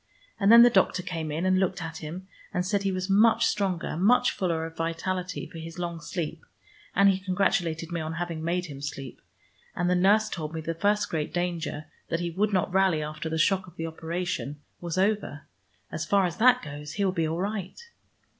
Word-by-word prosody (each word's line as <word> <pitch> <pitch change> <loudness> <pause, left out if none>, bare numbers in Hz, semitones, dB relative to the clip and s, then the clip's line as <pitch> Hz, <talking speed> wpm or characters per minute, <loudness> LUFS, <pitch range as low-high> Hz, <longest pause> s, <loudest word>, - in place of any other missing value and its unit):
And 200 0 +4
then 235 0 +10
the 240 - +6
doctor 190 -3 +2
came 165 -4 -4
in, 160 +4 -2
and 185 0 +3
looked 190 0 0
at 165 -2 -5
him, 170 +5 -7 0.2
and 180 - -1
said 200 +1 +1
he 195 -1 0
was 185 0 -2
much 220 +3 +5
stronger, 190 -6 -1
much 205 +9 +4
fuller 165 -4 -1
of 165 0 -8
vitality 180 +2 -3
for 165 0 -10
his 165 +1 -8
long 170 -1 -4
sleep, 165 -4 -4 0.5
and 200 +1 +6
he 190 -1 +3
congratulated 180 -4 0
me 170 -1 -2
on 160 +1 -4
having 165 -1 -4
made 175 +2 0
him 140 -4 -9
sleep. 135 -3 -6 0.5
And 175 - 0
the 180 - +3
nurse 205 +4 +4
told 160 -5 -5
me 160 - -3
the 165 +1 -3
first 205 +4 +1
great 155 -2 -2
danger, 170 -4 -2 0.2
that 165 - 0
he 175 -1 -2
would 205 +5 0
not 185 -2 0
rally 190 -5 +3
after 155 +1 -5
the 160 - -2
shock 190 +4 +2
of 175 - -15
the 165 - -4
operation, 165 -2 -4 0.2
was 170 0 -4
over. 205 +3 0 0.5
As - - -3
far 200 -1 +3
as 175 -2 -3
that 250 +2 +5
goes 150 0 -7
he 200 +2 0
will 190 - +2
be 165 -3 0
all 165 +2 -2
right." 195 -1 -3
175 Hz, 210 wpm, -27 LUFS, 160-195 Hz, 0.5 s, then